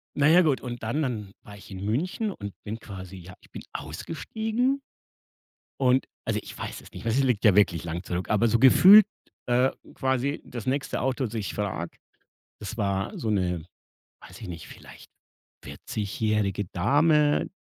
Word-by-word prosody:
Na 145 +1 +3
ja, 175 +3 +7
gut 150 -6 +1
und 120 -2 -6
dann 120 +8 -1
dann 110 -8 -3
war 100 0 -12
ich 100 - -14
in 95 +1 -7
München 180 - -1
und 100 - -7
bin 110 +2 -5
quasi 95 -3 -9
ja, 90 +1 -11
ich - - -21
bin - - -8
ausgestiegen 220 - -2 1.0
und 130 0 +3 0.2
also - - -1
ich - - -10
weiß - - -6
es - - -15
nicht 90 - -9
mehr, 115 - 0
es 135 +3 +3
liegt 125 -5 +1
ja 105 -4 +6
wirklich 85 -5 +3
lang 85 +2 -4
zurück, 90 0 -4
aber 110 +2 +3
so 115 +1 +2
gefühlt, 190 - +9 0.4
äh, 125 +2 +3 0.2
quasi 130 +2 -1
das 120 -3 -7
nächste 135 +1 -1
Auto, 130 +1 0
dass 110 - -9
ich 105 -3 -3
frage, 95 -5 -4 0.6
das 105 +2 -6
war 100 -2 -1
so 110 - -2
'ne, 90 -4 -1 0.6
weiß - - -13
ich - - -7
nicht, 85 - -8
vielleicht - - -14 0.5
vierzig-jährige 105 -1 -2
Dame. 150 - +3
115 Hz, 175 wpm, -26 LUFS, 100-140 Hz, 1.0 s, gefühlt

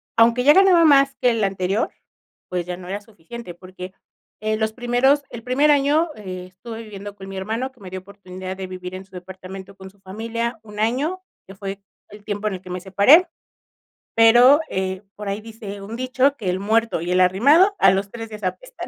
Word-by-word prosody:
Aunque 235 +2 +4
ya 290 +3 +7
ganaba 370 -3 +6
más 275 -2 +5
que 250 - +2
el 225 -2 0
anterior, 195 +2 0 0.6
pues, 180 -1 -2
ya 180 0 -4
no 180 -1 -11
era 200 +2 -4
suficiente 205 -1 -11
porque, 185 +1 -10 0.5
eh, 215 +1 -1
los 220 0 0
primeros 250 +4 +2
el 235 - -7
primer 270 +5 +3
año, 295 +4 +3
eh, 185 -3 -7
estuve 225 +4 -9
viviendo 205 -1 -9
con 190 -1 -11
mi 195 - -7
hermano 225 +7 -3
que 260 - -27
me 190 -3 -10
dio 185 0 -6
oportunidad 185 -1 -9
de 190 -1 -5
vivir 185 0 -8
en 185 - -7
su 190 - -32
departamento 190 +1 -10
con 190 0 -11
su 200 +1 -26
familia 230 +5 -4
1 210 -1 -10
año, 275 +12 0 0.3
que 195 - -12
fue 195 0 -6 0.3
el 210 0 -13
tiempo 205 0 -3
en 210 - -1
el 185 - -9
que 185 - -13
me 180 0 -4
separé. 200 - +5 0.9
Pero, 240 +5 +7
eh, 190 0 -3
por 210 0 -7
ahí 200 +2 -3
dice 215 -2 -9
un 205 +3 -7
dicho 255 +3 +1
que: 200 -7 -3
"El 185 - -2
muerto 220 -2 +1
y 175 +1 -3
el 180 +1 +3
arrimado 285 - +5
a 195 - +7
los 195 +1 -1
3 225 -1 -7
días 215 -1 -10
apestan". - - -5
210 Hz, 210 wpm, -22 LUFS, 190-245 Hz, 0.9 s, ya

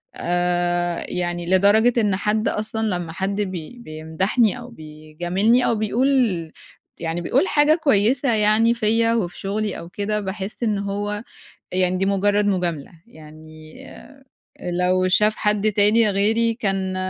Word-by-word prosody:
آآ 175 0 -1
يعني 175 -1 -3
لدرجة 205 +6 +4
إن 205 -3 +1
حد 210 +2 -1
أصلًا 220 +1 -2
لمّا 175 -4 -3
حد 195 +4 -2
بي 185 +2 -6
بيمدَحني 190 +7 -1
أو 245 0 -10
بيجاملني 175 +7 -1
أو 235 - +1
بيقول، 220 - 0 0.5
ت - - -19
يعني 165 +1 -3
بيقول 270 - +1
حاجة 295 +1 +3
كويسة 250 +1 +2
يعني 215 +2 +3
فيّا 230 0 +1
وفي 185 -7 -2
شُغلي 205 +1 -3
أو 170 - -10
كده، 210 +3 -2
باحس 200 +3 -5
إن 215 -3 0
هو 205 +1 -3 0.5
يعني 185 0 +1
دي 190 - 0
مُجرّد 200 +1 +1
مُجاملة، 175 -7 -2 0.2
يعني 155 -3 -14 0.9
لو 180 +1 0
شاف 210 +3 +3
حد 210 0 0
تاني 210 +2 +3
غيري 220 +4 +1
كان 195 -5 -2
200 Hz, 135 wpm, -21 LUFS, 175-220 Hz, 0.9 s, لدرجة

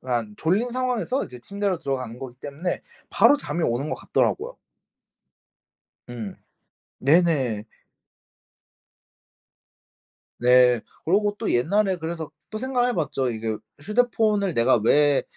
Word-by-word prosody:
그러니까 120 -4 -2
졸린 200 +10 +1
상황에서 255 +1 -1
이제 125 - -11
침대로 200 +6 -2
들어가는 130 -5 -4
거기 130 -2 -8
때문에 145 +7 -4 0.3
바로 290 - +5
잠이 175 - -3
오는 120 +6 -1
것 - - 0
같더라고요. 485 +4 -1 1.5
음 115 -5 -6 0.7
네네. 140 -8 +2 2.7
네. 125 -1 +5 0.2
그러고 205 +4 +2
또 225 - -1
옛날에 190 +10 +2
그래서 160 -2 -5 0.2
또 215 - -4
생각해 250 0 0
봤죠. 140 - -1
이게 110 -1 -3 0.2
'휴대폰을 210 -2 +1
내가 120 +2 +4
왜 145 +4 +4
160 Hz, 255 characters per minute, -24 LUFS, -, 2.7 s, 바로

